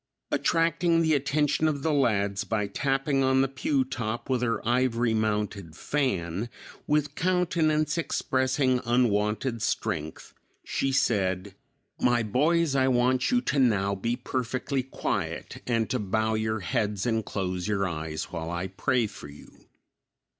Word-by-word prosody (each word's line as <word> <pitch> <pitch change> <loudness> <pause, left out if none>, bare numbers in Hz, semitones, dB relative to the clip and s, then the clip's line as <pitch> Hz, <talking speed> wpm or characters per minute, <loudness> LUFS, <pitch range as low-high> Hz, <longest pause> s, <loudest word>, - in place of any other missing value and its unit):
Attracting 165 0 +2
the 160 -1 +3
attention 150 +2 +1
of 145 -3 -1
the 160 - +1
lads 100 -8 +1
by 105 -2 -1
tapping 135 +5 0
on 130 0 +3
the - - +1
pew 135 +1 0
top 120 -1 -4
with 125 -2 +1
her 115 -1 -1
ivory 120 -1 +2
mounted 105 -6 -1
fan, 105 - -1 0.4
with 150 -1 +1
countenance 165 -3 +1
expressing 130 -4 +1
unwonted 115 0 +1
strength, 80 -5 -3 0.3
she 135 - -1
said, 95 -6 0 0.5
"My 120 -1 +3
boys, 150 +7 +2
I 130 -1 +3
want 125 +1 +2
you 245 -1 +3
to 145 - 0
now 100 -6 +3
be 115 +5 -1
perfectly 130 +2 -2
quiet, 130 - -4
and 115 -2 +1
to 130 - 0
bow 110 +2 0
your 110 0 -1
heads 105 +2 -1
and 115 -2 +1
close 90 -3 -3
your 100 -2 0
eyes 80 -2 -4
while 80 -1 -4
I 85 +2 -3
pray 120 +5 +1
for 100 -7 -9
you." 70 0 -16
120 Hz, 140 wpm, -27 LUFS, 105-135 Hz, 0.5 s, the